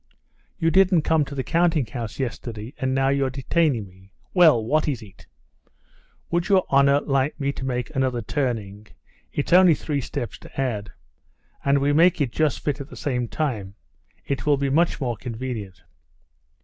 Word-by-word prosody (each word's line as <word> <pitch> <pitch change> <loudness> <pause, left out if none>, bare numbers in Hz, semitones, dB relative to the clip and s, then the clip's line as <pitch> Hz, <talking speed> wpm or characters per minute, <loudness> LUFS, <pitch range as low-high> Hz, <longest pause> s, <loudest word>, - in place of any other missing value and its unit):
"You 165 -2 +1
didn't 185 -3 +4
come 160 -1 +2
to 140 - -8
the 130 - -2
counting 165 -3 +2
house 115 -2 -6
yesterday, 120 -2 -5
and 130 -1 0
now 135 0 +2
you're 140 -1 +1
detaining 135 - 0
me. 95 +1 -20 0.2
Well, 155 - +5
what 155 +7 +1
is 130 -6 -2
it?" 95 -4 -16 1.0
"Would 175 +3 0
your 190 -2 +4
honor 140 +1 +4
let 135 +1 0
me 140 0 -1
make 125 -2 -3
another 130 -3 0
turning? 110 -6 -3 0.4
It's 145 - -2
only 180 -3 +7
three 145 -1 -3
steps 120 -3 -5
to - - -11
add. 110 -6 -2 0.7
And 140 0 +3
we 140 +1 +2
make 170 +3 +4
it 135 -5 0
just 155 0 0
fit 145 -1 -2
at 140 - -8
the - - -11
same 125 -5 -2
time. 110 -10 -3 0.5
It 140 +1 -3
will 145 -1 +4
be 140 0 -1
much 165 +3 +2
more 120 -5 -2
convenient." 115 -5 -6
135 Hz, 170 wpm, -23 LUFS, 120-150 Hz, 1.0 s, only